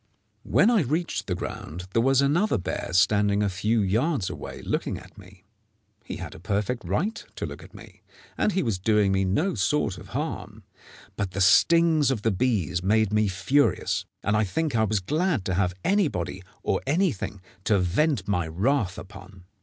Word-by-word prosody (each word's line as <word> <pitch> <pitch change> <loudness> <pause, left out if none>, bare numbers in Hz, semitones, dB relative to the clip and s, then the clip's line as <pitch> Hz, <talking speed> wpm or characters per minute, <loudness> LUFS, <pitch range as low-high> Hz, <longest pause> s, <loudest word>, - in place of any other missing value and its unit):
When 225 - +3
I 225 -5 +4
reached 160 +5 -2
the 90 - -1
ground, 90 0 -6
there 115 - +3
was 135 +2 +3
another 165 - +2
bear 90 - -4
standing 100 +3 +3
a 100 - +1
few 105 +5 0
yards 110 - 0
away - - -8
looking - - -2
at - - -14
me. 95 -2 -16 0.6
He - - -6
had - - -7
a - - -11
perfect 105 +6 -2
right 210 +7 -2
to - - -4
look - - -8
at - - -16
me, - - -14 0.3
and 210 - +1
he 190 - +1
was 110 -6 -1
doing 105 0 +2
me 95 0 +1
no 150 - +1
sort 105 -2 0
of 95 - -12
harm; 110 - -5 0.5
but 100 -2 -3
the 95 - -3
stings 160 - +5
of 120 -6 -1
the 115 - +2
bees 95 -5 0
made 105 +2 +2
me 105 0 +3
furious, 130 +10 +1 0.2
and 105 - +1
I 105 - +3
think 150 +7 -1
I 110 -1 +3
was 105 -2 0
glad 155 - 0
to 95 - -1
have 90 0 0
anybody 140 - 0 0.2
or 95 - 0
anything 150 - 0 0.3
to 105 - +3
vent 95 - +1
my 90 -5 0
wrath 100 - 0
upon. 95 -1 -12
105 Hz, 185 wpm, -26 LUFS, 95-145 Hz, 0.6 s, stings